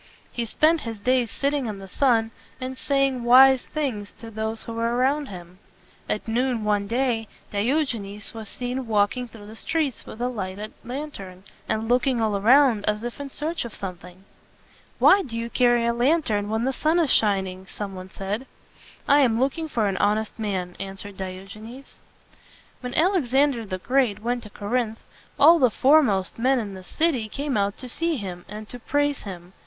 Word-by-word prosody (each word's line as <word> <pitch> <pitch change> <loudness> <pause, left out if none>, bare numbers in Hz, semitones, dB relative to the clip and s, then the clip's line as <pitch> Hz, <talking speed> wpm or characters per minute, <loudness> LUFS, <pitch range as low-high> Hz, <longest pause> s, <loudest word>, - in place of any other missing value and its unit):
He 235 - -2
spent 310 +7 +3
his 225 -2 -6
days 250 +2 +2
sitting 280 0 -1
in 210 -2 -4
the 195 0 -10
sun, 225 0 +2 0.3
and 260 0 -4
saying 275 -2 0
wise 260 +2 +7
things 245 -10 -3
to 230 -1 -11
those 220 +1 -3
who 230 - -7
were 230 +1 0
around 275 +4 +1
him. 180 -1 -11 0.5
At 210 - -2
noon 240 0 0
one 205 -1 +1
day, 235 -1 0 0.2
Di 205 +4 +1
og 300 -3 +1
e 230 - -4
nes 200 +1 -7
was 220 -2 -8
seen 250 0 -4
walking 215 +3 +1
through 225 -3 -13
the 215 +2 -11
streets 300 0 -1
with 220 - -9
a 245 - 0
lighted 205 -3 -5
lantern, 230 -9 -7 0.3
and 220 +1 -1
looking 245 +1 +2
all 220 -2 +1
around 235 +1 +5
as 210 +1 0
if 240 +2 -5
in 285 -1 -5
search 315 +5 -3
of 235 -3 -8
something. 180 -1 -8 0.7
"Why 395 - +6
do 235 -10 -6
you 230 0 -4
carry 240 -2 +3
a 235 - +2
lantern 240 -5 +1
when 220 +1 0
the 265 - 0
sun 310 +5 +1
is 325 -6 +2
shining?" 190 -3 +1
some 200 -1 -6
one 185 0 -8
said. 205 +7 -4 0.6
"I 285 - +6
am 235 -5 +3
looking 280 +5 0
for 230 -7 0
an 195 -1 -1
honest 210 +3 0
man," 185 -4 -3
answered 195 +1 -6
Diogenes. 195 +7 -9 0.8
When 250 0 -6
Alexander 280 - +2
the 185 -1 -3
Great 245 0 +1
went 245 +1 -1
to 215 - -11
Cor 205 +1 -7
inth, 235 -3 0 0.4
all 330 +4 +7
the 255 - +5
fore 285 +8 +5
most 195 -6 -1
men 260 +3 +3
in 205 -4 -5
the 190 -1 -9
city 260 - 0
came 280 +3 -3
out 200 -1 0
to 255 - -7
see 330 +6 -1
him 185 -7 -6
and 210 +1 -8
to 245 - -8
praise 290 +3 0
him. 180 -2 -9
230 Hz, 190 wpm, -24 LUFS, 205-265 Hz, 0.8 s, wise